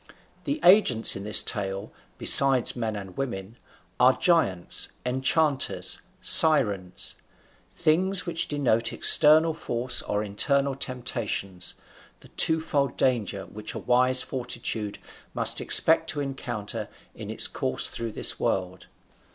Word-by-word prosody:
The 290 +2 -4
agents 175 - +4
in 100 +1 -8
this 105 - +2
tale, 100 -1 -3 0.3
besides 135 -3 +5
men 115 -3 -5
and 95 -3 -10
women, 115 -5 -7 0.4
are 130 +1 +3
giants, 100 - 0
enchanters, 135 +3 -1 0.2
sirens: 105 - +3 0.6
things 185 +5 +2
which 170 -2 -2
denote 120 -6 -1
external 160 +2 +4
force 125 -5 -3
or 105 0 -4
internal 140 +7 0
temptations, 115 -8 -5 0.5
the - - -17
twofold 155 -5 -1
danger 105 -7 -2
which 105 0 -8
a - - -5
wise 130 +1 +3
fortitude 115 -5 -6 0.4
must - - 0
expect - - +4
to 145 - -2
encounter 135 -7 -7 0.2
in - - -11
its - - +3
course - - -4
through 115 -2 -7
this - - +2
world. 95 -1 -4
125 Hz, 120 wpm, -24 LUFS, 105-145 Hz, 0.6 s, besides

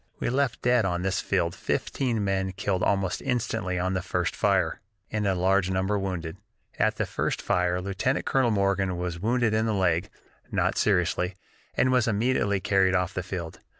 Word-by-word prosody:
"We - - -1
left 135 0 0
dead 125 -1 +4
on 90 -2 -1
this 95 0 0
field 85 -3 0
fifteen 120 -6 -1
men 95 -1 -1
killed 95 -1 -1
almost 95 -2 0
instantly 95 -7 -1
on 90 +1 0
the 95 - -1
first 90 -1 -1
fire, - - +1 0.3
and 105 -1 0
a 95 - +2
large 95 +1 +2
number 95 +2 0
wounded. 85 -4 -4 0.4
At - - +2
the - - -1
first - - -2
fire 90 0 +1
Lieutenant 100 +8 -1
Colonel 130 -3 +2
Morgan 100 -3 +1
was 90 -1 -3
wounded 115 +2 +1
in 110 +1 +1
the 110 - 0
leg 90 -2 +1 0.4
(not - - +1
seriously), 90 -2 +1 0.4
and 130 - +3
was 125 -2 +3
immediately 105 -2 +1
carried 95 0 +2
off 90 0 0
the 90 - -2
field. 90 -2 -6
95 Hz, 180 wpm, -27 LUFS, 90-110 Hz, 0.4 s, dead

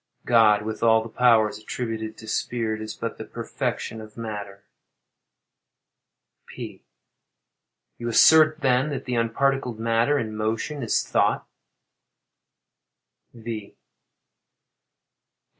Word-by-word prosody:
God, 110 -3 +5
with 110 0 -5
all 110 -1 +4
the 115 - -8
powers 115 -4 +4
attributed 110 -1 -5
to 110 - -12
spirit, 110 -1 -2
is 110 0 -6
but 115 0 -5
the - - -4
perfection 110 - -4
of 110 0 -13
matter. 105 -3 -6 1.8
P. - - -9 1.2
You 120 - -4
assert, 155 +5 +6
then, 130 +1 +2
that 140 - -5
the 125 - -3
unparticled 125 +1 0
matter, 115 +5 +2
in 110 -4 -3
motion, 110 +7 -2
is 115 - +1
thought? - - +1
115 Hz, 100 wpm, -24 LUFS, 110-125 Hz, 1.8 s, assert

